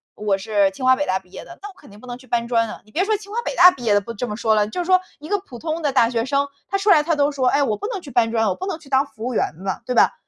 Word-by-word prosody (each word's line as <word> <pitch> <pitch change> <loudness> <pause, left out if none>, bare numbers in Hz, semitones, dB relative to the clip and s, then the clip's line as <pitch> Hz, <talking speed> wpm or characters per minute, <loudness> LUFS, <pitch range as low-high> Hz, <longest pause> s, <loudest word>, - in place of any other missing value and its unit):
我 205 -2 0
是 200 -1 +1
清 255 +7 -6
华 260 0 +6
北 290 - -2
大 190 -6 0
毕 185 -1 -26
业 - - -9
的， 345 - -12
那 410 - -7
我 - - -14
肯 - - -17
定 205 - -15
不 250 - -14
能 245 0 -6
去 260 - -18
搬 235 0 -1
砖 230 -1 +1
啊。 - - -9
你 215 - -22
别 360 - +1
说 435 +1 +1
清 405 0 -13
华 470 - -2
北 - - -4
大 360 -4 +9
毕 255 - -11
业 215 -3 +2
的 205 - +3
不 230 +4 -8
这 240 +3 -4
么 210 - -4
说 220 -1 +1
了， 210 -1 +2
就 350 +12 -3
说 370 +1 +4 0.2
一 300 +2 -10
个 410 - +2
普 260 -11 -12
通 325 +1 -3
的 290 - 0
大 235 -3 +3
学 230 -1 -1
生， 280 +1 0 0.2
他 395 - 0
出 400 +2 0
来 305 -6 +6
他 325 0 0
都 290 0 +2
说， 265 -3 0
哎： 285 - +3
“我 215 -6 -1
不 415 - -5
能 420 -6 -4
去 290 - -11
搬 230 -2 +2
砖， 225 -1 +1
我 190 - 0
不 375 - -6
能 375 -5 -4
去 285 - -17
当 270 +1 +3
服 225 -4 -10
务 250 - -2
员 150 - 0
嘛， 190 +1 -4
“对 250 - -2
吧。 - - +5
255 Hz, 395 characters per minute, -21 LUFS, 220-330 Hz, 0.2 s, 大